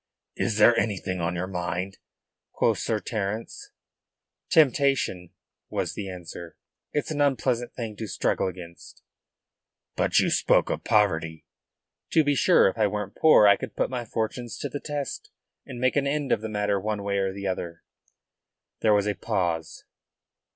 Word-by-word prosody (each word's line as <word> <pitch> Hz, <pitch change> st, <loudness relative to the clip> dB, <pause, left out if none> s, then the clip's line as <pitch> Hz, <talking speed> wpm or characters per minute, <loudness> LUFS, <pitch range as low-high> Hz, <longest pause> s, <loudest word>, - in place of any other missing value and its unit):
"Is 115 Hz, -3 st, -1 dB
there 120 Hz, +2 st, +6 dB
anything 95 Hz, -3 st, -2 dB
on 85 Hz, +1 st, -1 dB
your 90 Hz, +1 st, -2 dB
mind?" 90 Hz, +1 st, -4 dB, 0.5 s
quoth -, -, +1 dB
Sir 110 Hz, -, -1 dB
Terence. 110 Hz, +1 st, -4 dB, 0.8 s
"Temptation," 135 Hz, -, +2 dB, 0.4 s
was -, -, -2 dB
the 100 Hz, -2 st, -5 dB
answer. 85 Hz, -2 st, -9 dB, 0.3 s
"It's 150 Hz, +1 st, -2 dB
an 145 Hz, -1 st, -1 dB
unpleasant 130 Hz, -3 st, 0 dB
thing 115 Hz, -4 st, -5 dB
to 110 Hz, -, -5 dB
struggle 95 Hz, -, 0 dB
against." 85 Hz, -2 st, -10 dB, 0.9 s
"But -, -, +1 dB
you -, -, +4 dB
spoke -, -, +3 dB
of -, -, -3 dB
poverty?" 80 Hz, -7 st, +1 dB, 0.7 s
"To 160 Hz, -, +5 dB
be 145 Hz, 0 st, +2 dB
sure. 135 Hz, -, +5 dB
If 95 Hz, -, -2 dB
I 105 Hz, -, +4 dB
weren't 105 Hz, +1 st, -4 dB
poor 155 Hz, -9 st, +6 dB
I 100 Hz, -, +7 dB
could 130 Hz, +2 st, -8 dB
put -, -, -1 dB
my 125 Hz, -2 st, -3 dB
fortunes 115 Hz, +1 st, -4 dB
to 145 Hz, -, -4 dB
the 145 Hz, -, -5 dB
test, 145 Hz, -2 st, -5 dB, 0.4 s
and 125 Hz, -2 st, -7 dB
make 130 Hz, +1 st, +1 dB
an 140 Hz, -1 st, +1 dB
end 145 Hz, -1 st, -1 dB
of 110 Hz, -, +2 dB
the 110 Hz, -, -4 dB
matter 105 Hz, -1 st, 0 dB
one 105 Hz, 0 st, -3 dB
way 100 Hz, 0 st, 0 dB
or 95 Hz, -1 st, 0 dB
the 100 Hz, +1 st, -7 dB
other." 85 Hz, -3 st, -4 dB, 1.0 s
There 110 Hz, -1 st, +4 dB
was 100 Hz, -1 st, +2 dB
a 105 Hz, -, 0 dB
pause. 90 Hz, -8 st, -2 dB
105 Hz, 165 wpm, -26 LUFS, 95-125 Hz, 1.0 s, I